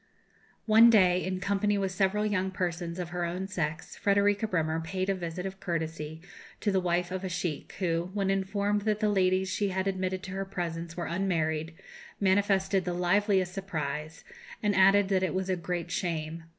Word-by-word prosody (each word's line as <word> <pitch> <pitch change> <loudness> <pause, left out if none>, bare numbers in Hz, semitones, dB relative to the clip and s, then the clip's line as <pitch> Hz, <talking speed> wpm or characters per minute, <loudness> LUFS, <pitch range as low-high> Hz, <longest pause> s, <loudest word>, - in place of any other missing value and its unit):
One 225 +1 +7
day, 185 -5 +5
in 185 0 -2
company 200 +1 +1
with 195 -1 -1
several 195 +2 +1
young 190 -3 0
persons 175 -2 -3
of 180 -2 -4
her 175 0 -3
own 180 +3 -3
sex, 165 -4 -3
Frederika 205 +1 +2
Bremer 160 -4 0
paid 185 +4 -2
a - - +2
visit 180 0 -5
of 190 0 -6
courtesy 160 -3 -4 0.4
to 205 - +1
the 190 - +2
wife 180 0 0
of 185 0 -3
a 190 - -2
sheikh, 170 -4 -3
who, 170 -1 -1
when 195 -1 +1
informed 200 +2 0
that 210 0 0
the 215 -1 +2
ladies 190 -1 +2
she 205 +2 0
had 190 0 -1
admitted 185 -1 -2
to 190 - -7
her 195 +1 -2
presence 170 -3 -5
were 170 - -2
unmarried, 165 -3 -1 0.4
manifested 195 -1 +2
the 175 0 -2
liveliest 185 +1 +2
surprise, 155 -5 -4 0.4
and 210 -1 +2
added 195 +1 +5
that 190 -2 +2
it 185 - -1
was 190 0 -1
a - - +2
great 175 -1 -4
shame. 165 -1 -3
185 Hz, 185 wpm, -29 LUFS, 170-195 Hz, 0.4 s, One